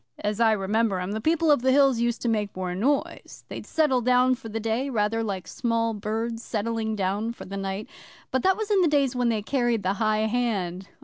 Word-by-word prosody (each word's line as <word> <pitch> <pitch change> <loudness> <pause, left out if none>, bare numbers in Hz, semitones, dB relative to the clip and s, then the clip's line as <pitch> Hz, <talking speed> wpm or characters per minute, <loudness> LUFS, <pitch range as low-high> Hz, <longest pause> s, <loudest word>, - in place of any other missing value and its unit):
'As 210 +1 -3
I 225 -1 +5
remember 210 0 0
'em, 180 +2 -3
the 220 +1 -3
People 320 +4 +2
of 285 - +4
the 260 +1 +3
Hills 270 -3 +4
used 235 0 -1
to - - 0
make 210 -3 -1
more 185 -1 -3
noise. 265 +10 -2
They'd - - -7
settle 295 -6 +2
down 250 +1 +4
for 245 -3 -7
the 225 +1 -3
day 225 +5 -1
rather 225 -2 0
like 195 -4 -4
small 230 -2 -1
birds 225 +2 -3
settling 220 0 -2
down 205 +4 -1
for - - -10
the 195 - -7
night. 195 +1 -4 0.4
But 260 - +1
that 380 0 +3
was 430 -1 -3
in 395 -2 +4
the 350 - +4
days 280 -4 +2
when 245 -1 +1
they 220 -2 -1
carried 240 -3 0
the 185 +1 +1
high 215 0 +2
hand. 200 -6 -1
225 Hz, 225 wpm, -25 LUFS, 210-250 Hz, 0.4 s, I